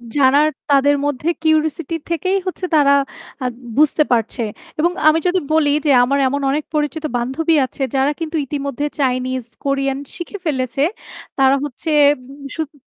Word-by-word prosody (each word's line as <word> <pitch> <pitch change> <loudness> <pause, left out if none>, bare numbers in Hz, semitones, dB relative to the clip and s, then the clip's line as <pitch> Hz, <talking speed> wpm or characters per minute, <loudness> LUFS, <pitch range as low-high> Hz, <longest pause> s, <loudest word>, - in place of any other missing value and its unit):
যারা 275 -1 +4 0.3
তাদের 285 0 +4
মধ্যে 290 +3 -1
কিউরিওসিটি 315 0 +1
থেকেই 370 +4 0
হচ্ছে 370 0 -3
তারা 285 -2 +5 0.5
আ - - -1 0.3
বুঝতে 305 +1 +4
পারছে। 235 +1 0 0.4
এবং 340 +3 +3 0.2
আমি 310 +1 +5
যদি 365 +1 +2
বলি 310 -2 +3 0.2
যে 295 - +4
আমার 275 +3 +1
এমন 280 +2 -1
অনেক 300 +2 -1
পরিচিত 300 +1 -1
বান্ধবী 270 +7 0
আছে 260 - -10
যারা 270 +2 +2
কিন্তু 325 0 -4
ইতিমধ্যে 280 0 -3
চাইনিজ, 255 -1 0 0.2
কোরিয়ান 275 -1 0 0.2
শিখে 350 +4 -6
ফেলেছে। 265 -2 -1 0.6
তারা 270 0 +5
হচ্ছে 290 +3 -5 0.3
উম 275 +2 -13
শুধু 315 -1 -4
285 Hz, 150 wpm, -19 LUFS, 270-315 Hz, 0.6 s, তারা